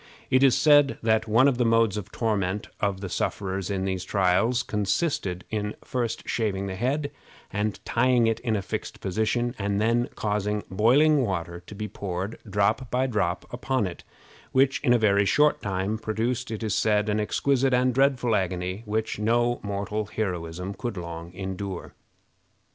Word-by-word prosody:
It 130 Hz, -, +5 dB
is 135 Hz, -3 st, +5 dB
said 145 Hz, -2 st, +5 dB
that 110 Hz, 0 st, +2 dB
one 115 Hz, +5 st, +5 dB
of 130 Hz, -3 st, +1 dB
the -, -, +4 dB
modes 115 Hz, -3 st, +3 dB
of 105 Hz, -4 st, -5 dB
torment 105 Hz, -3 st, -1 dB
of 100 Hz, -2 st, -1 dB
the 100 Hz, -, -4 dB
sufferers 95 Hz, +1 st, -2 dB
in 95 Hz, -1 st, -1 dB
these 95 Hz, -1 st, -2 dB
trials 100 Hz, +6 st, +2 dB
consisted 100 Hz, -, -1 dB
in 105 Hz, -1 st, -2 dB
first 120 Hz, -4 st, -3 dB
shaving 100 Hz, -4 st, -1 dB
the 95 Hz, -, -4 dB
head 140 Hz, +8 st, -1 dB, 0.4 s
and 105 Hz, 0 st, -1 dB
tying 120 Hz, 0 st, +3 dB
it 115 Hz, 0 st, +1 dB
in 115 Hz, -2 st, -1 dB
a 100 Hz, -, -2 dB
fixed -, -, -5 dB
position, 110 Hz, +5 st, 0 dB
and 100 Hz, 0 st, 0 dB
then 115 Hz, +3 st, +2 dB
causing 105 Hz, 0 st, -1 dB
boiling 135 Hz, +9 st, +4 dB
water 85 Hz, -5 st, -3 dB
to 105 Hz, -, -9 dB
be 105 Hz, +1 st, -4 dB
poured, 95 Hz, 0 st, -5 dB
drop 105 Hz, +6 st, +1 dB
by 130 Hz, +1 st, +1 dB
drop, 100 Hz, -8 st, -1 dB
upon 125 Hz, -1 st, 0 dB
it, 90 Hz, -2 st, -6 dB, 0.5 s
which 135 Hz, +1 st, +3 dB
in 130 Hz, -, +1 dB
a 120 Hz, -, +6 dB
very 100 Hz, -2 st, +3 dB
short 150 Hz, +6 st, +3 dB
time 100 Hz, +2 st, -2 dB
produced, 115 Hz, +3 st, -2 dB
it 110 Hz, 0 st, -4 dB
is 110 Hz, -3 st, -1 dB
said, 105 Hz, 0 st, +2 dB
an 105 Hz, 0 st, +1 dB
exquisite 135 Hz, +5 st, +1 dB
and 125 Hz, 0 st, +3 dB
dreadful 130 Hz, -3 st, +2 dB
agony 90 Hz, +1 st, -2 dB
which 110 Hz, 0 st, -2 dB
no 120 Hz, +2 st, +2 dB
mortal 100 Hz, +1 st, -3 dB
heroism 90 Hz, -3 st, -3 dB
could 120 Hz, -1 st, -5 dB
long 85 Hz, 0 st, -6 dB
endure. 95 Hz, 0 st, -5 dB
105 Hz, 170 wpm, -26 LUFS, 95-120 Hz, 0.5 s, a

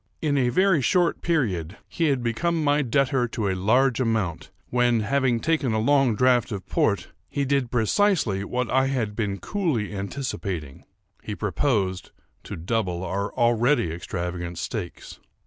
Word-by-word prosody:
In 150 Hz, -3 st, 0 dB
a 130 Hz, -3 st, +2 dB
very 185 Hz, +3 st, +3 dB
short 175 Hz, +6 st, +2 dB
period 100 Hz, -, -1 dB
he 165 Hz, -, -1 dB
had 135 Hz, -5 st, +1 dB
become 160 Hz, +8 st, 0 dB
my 145 Hz, 0 st, +3 dB
debtor 130 Hz, -1 st, +1 dB
to 110 Hz, -2 st, -3 dB
a -, -, +1 dB
large 115 Hz, +7 st, +2 dB
amount, 110 Hz, -9 st, -1 dB, 0.2 s
when, 120 Hz, -2 st, +2 dB
having 130 Hz, +1 st, +1 dB
taken 155 Hz, -4 st, 0 dB
a 110 Hz, -, +1 dB
long 135 Hz, 0 st, +3 dB
draught 125 Hz, +1 st, +3 dB
of 100 Hz, -3 st, -5 dB
port, -, -, 0 dB, 0.2 s
he 140 Hz, -, -1 dB
did 135 Hz, -2 st, +1 dB
precisely 120 Hz, -, +1 dB
what 125 Hz, +3 st, -2 dB
I 130 Hz, +1 st, +3 dB
had 120 Hz, -6 st, -2 dB
been 105 Hz, -3 st, -2 dB
coolly 145 Hz, -, -2 dB
anticipating—he 100 Hz, -, -6 dB
proposed 100 Hz, -4 st, -1 dB, 0.4 s
to -, -, -6 dB
double 90 Hz, 0 st, -2 dB
our 100 Hz, +3 st, -2 dB
already 120 Hz, -, +2 dB
extravagant 85 Hz, 0 st, -5 dB
stakes. 95 Hz, 0 st, -6 dB
120 Hz, 145 wpm, -25 LUFS, 100-140 Hz, 0.4 s, very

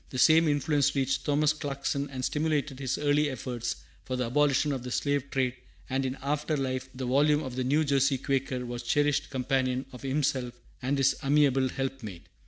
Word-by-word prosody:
The 130 Hz, -, -6 dB
same 160 Hz, +5 st, +6 dB
influence 145 Hz, -1 st, +1 dB
reached 135 Hz, 0 st, 0 dB
Thomas 150 Hz, +1 st, +3 dB
Clarkson 140 Hz, -1 st, -3 dB
and 130 Hz, -2 st, -4 dB
stimulated 150 Hz, -3 st, -1 dB
his 130 Hz, -1 st, -1 dB
early 145 Hz, 0 st, +2 dB
efforts 120 Hz, -2 st, -4 dB, 0.3 s
for 130 Hz, -, -3 dB
the 125 Hz, -1 st, -1 dB
abolition 145 Hz, +3 st, +2 dB
of 135 Hz, -3 st, -2 dB
the 125 Hz, -, -6 dB
slave 140 Hz, +2 st, -1 dB
trade; 130 Hz, -2 st, 0 dB, 0.4 s
and 135 Hz, 0 st, 0 dB
in 130 Hz, +1 st, -4 dB
after 150 Hz, +2 st, -1 dB
life 130 Hz, -1 st, -2 dB
the 130 Hz, 0 st, -4 dB
volume 145 Hz, +4 st, +3 dB
of 130 Hz, -3 st, -6 dB
the 130 Hz, -, -1 dB
New 145 Hz, +5 st, +2 dB
Jersey 140 Hz, -2 st, +2 dB
Quaker 130 Hz, -2 st, -2 dB
was 120 Hz, 0 st, -5 dB
the 120 Hz, -, -10 dB
cherished 145 Hz, 0 st, +2 dB
companion 130 Hz, -1 st, 0 dB
of 125 Hz, -, -10 dB
himself 135 Hz, -3 st, -1 dB, 0.3 s
and 135 Hz, +3 st, 0 dB
his 135 Hz, 0 st, +3 dB
amiable 135 Hz, -2 st, +3 dB
helpmate. 130 Hz, -10 st, -5 dB
135 Hz, 190 wpm, -28 LUFS, 130-145 Hz, 0.4 s, same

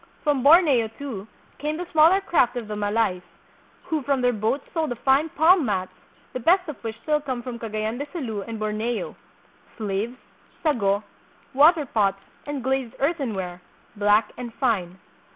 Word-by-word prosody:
From 290 Hz, -4 st, +1 dB
Borneo, 285 Hz, -5 st, +6 dB
too, 230 Hz, -8 st, -6 dB, 0.3 s
came 300 Hz, +2 st, -2 dB
the 355 Hz, -, -4 dB
smaller 325 Hz, +5 st, +5 dB
craft 320 Hz, -11 st, +2 dB
of 235 Hz, -3 st, -5 dB
the 210 Hz, -, -4 dB
Malays, 205 Hz, -2 st, 0 dB, 0.6 s
who 315 Hz, -3 st, -2 dB
from 275 Hz, -1 st, 0 dB
their 245 Hz, 0 st, +3 dB
boats 220 Hz, +6 st, -1 dB
sold 320 Hz, -2 st, 0 dB
the 245 Hz, -, -3 dB
fine 270 Hz, +6 st, +2 dB
palm 330 Hz, +3 st, +4 dB
mats, 190 Hz, -6 st, -1 dB, 0.4 s
the 255 Hz, -, -3 dB
best 360 Hz, +8 st, +3 dB
of 300 Hz, -5 st, -8 dB
which 225 Hz, 0 st, -5 dB
still 300 Hz, -1 st, +1 dB
come 260 Hz, -4 st, -4 dB
from 240 Hz, -2 st, -6 dB
Cagayan 220 Hz, +1 st, -3 dB
de 285 Hz, -, -4 dB
Sulu 235 Hz, -, -4 dB
and 225 Hz, +2 st, -6 dB
Borneo, 215 Hz, +2 st, -2 dB, 0.6 s
slaves, 215 Hz, +3 st, -3 dB, 0.5 s
sago, 205 Hz, -10 st, +1 dB, 0.5 s
water 300 Hz, +3 st, +5 dB
pots 200 Hz, -6 st, +1 dB, 0.3 s
and 290 Hz, -3 st, -4 dB
glazed 265 Hz, -2 st, -1 dB
earthenware, 220 Hz, -, -2 dB, 0.3 s
black 205 Hz, +1 st, +3 dB
and 240 Hz, -1 st, -6 dB
fine. 195 Hz, -9 st, 0 dB
245 Hz, 160 wpm, -24 LUFS, 215-295 Hz, 0.6 s, Borneo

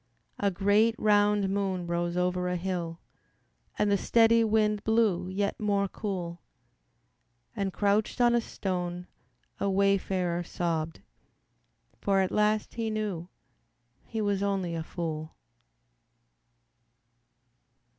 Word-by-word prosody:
A 200 Hz, -, +2 dB
great, 205 Hz, +4 st, +3 dB
round 205 Hz, -1 st, +3 dB
moon 190 Hz, -2 st, -1 dB
rose 170 Hz, 0 st, -1 dB
over 180 Hz, 0 st, 0 dB
a 180 Hz, -, -1 dB
hill 175 Hz, -2 st, -3 dB, 0.8 s
And 210 Hz, -1 st, +2 dB
the 200 Hz, -, +3 dB
steady 230 Hz, +2 st, +4 dB
wind 215 Hz, -1 st, +2 dB
blew 215 Hz, -5 st, +2 dB
yet 200 Hz, +2 st, -1 dB
more 200 Hz, -2 st, +1 dB
cool; 180 Hz, -5 st, -5 dB, 1.1 s
And 200 Hz, -3 st, -1 dB
crouched 205 Hz, +4 st, +1 dB
on 240 Hz, -1 st, +5 dB
a 240 Hz, -, +3 dB
stone 180 Hz, -4 st, -3 dB, 0.5 s
a 200 Hz, -, 0 dB
wayfarer 190 Hz, -3 st, +1 dB
sobbed, 165 Hz, -2 st, -3 dB, 1.0 s
For 195 Hz, -1 st, +2 dB
at 190 Hz, -, 0 dB
last 210 Hz, 0 st, +1 dB
he 225 Hz, -1 st, -2 dB
knew 205 Hz, -6 st, -3 dB, 0.8 s
he 225 Hz, -1 st, -3 dB
was 200 Hz, -2 st, 0 dB
only 195 Hz, -4 st, -1 dB
a 165 Hz, -, -2 dB
fool. 160 Hz, -1 st, -5 dB
195 Hz, 115 wpm, -28 LUFS, 175-210 Hz, 1.1 s, on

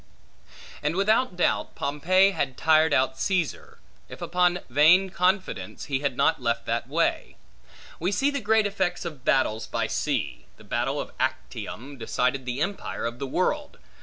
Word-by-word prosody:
And, 150 Hz, +3 st, -1 dB
without 215 Hz, +2 st, +2 dB
doubt, 175 Hz, -, 0 dB
Pompey 185 Hz, +7 st, +3 dB
had 135 Hz, -8 st, -2 dB
tired 160 Hz, 0 st, +4 dB
out 130 Hz, -1 st, +1 dB
Caesar, 185 Hz, -6 st, -2 dB, 0.3 s
if -, -, -10 dB
upon 180 Hz, 0 st, +1 dB
vain 165 Hz, +9 st, +5 dB
confidence, 185 Hz, +2 st, -1 dB
he 135 Hz, -3 st, -1 dB
had 140 Hz, -3 st, -2 dB
not -, -, +2 dB
left 115 Hz, -1 st, -1 dB
that 115 Hz, +1 st, -2 dB
way. -, -, 0 dB, 0.6 s
We 180 Hz, +4 st, 0 dB
see 275 Hz, +8 st, +1 dB
the 280 Hz, -2 st, -3 dB
great 220 Hz, 0 st, +3 dB
effects 190 Hz, -4 st, -1 dB
of 150 Hz, -6 st, -7 dB
battles 110 Hz, -5 st, +1 dB
by -, -, -1 dB
sea. -, -, -2 dB
The -, -, -16 dB
battle -, -, -1 dB
of -, -, -5 dB
Actium, 135 Hz, +5 st, -4 dB
decided 125 Hz, +3 st, -1 dB
the 125 Hz, +3 st, -3 dB
empire 195 Hz, -5 st, -3 dB
of 120 Hz, +1 st, -4 dB
the 140 Hz, -, -3 dB
world. 290 Hz, -, -1 dB
160 Hz, 160 wpm, -26 LUFS, 130-190 Hz, 0.6 s, vain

